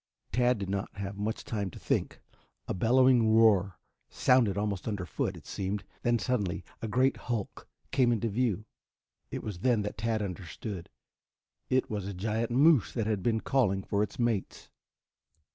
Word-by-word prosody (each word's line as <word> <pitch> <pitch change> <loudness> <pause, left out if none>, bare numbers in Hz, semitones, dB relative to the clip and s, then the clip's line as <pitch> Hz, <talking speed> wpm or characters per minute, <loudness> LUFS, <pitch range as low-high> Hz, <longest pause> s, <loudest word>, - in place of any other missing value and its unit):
Tad 125 0 +3
did 100 -2 -4
not 100 0 -2
have 100 0 -4
much 105 +2 -3
time 100 -4 -3
to - - -12
think. - - -1 0.5
A - - -1
bellowing 120 +2 +4
roar 100 -5 +4 0.3
sounded 120 -6 +3
almost 100 -1 -2
under 100 -4 -2
foot, 85 - -2
it - - -14
seemed, 100 +1 -3 0.2
then 120 0 +2
suddenly 100 -7 -1 0.2
a 115 - -3
great 130 +5 +2
hulk 115 -5 -4 0.2
came 125 -3 +3
into 115 -1 0
view. 110 -2 0 0.6
It - - -5
was 105 -5 -5
then 115 0 +2
that 105 +1 -5
Tad 110 -1 0
understood. 90 0 -6 0.8
It 130 0 +2
was 100 -3 -3
a 100 - -5
giant 110 +4 -1
moose 140 - +4
that 115 -4 -1
had 105 -3 0
been 110 +1 +1
calling 100 -8 +1
for 100 +1 0
its 105 - -2
mates. 115 -6 -2
110 Hz, 165 wpm, -30 LUFS, 100-120 Hz, 0.8 s, bellowing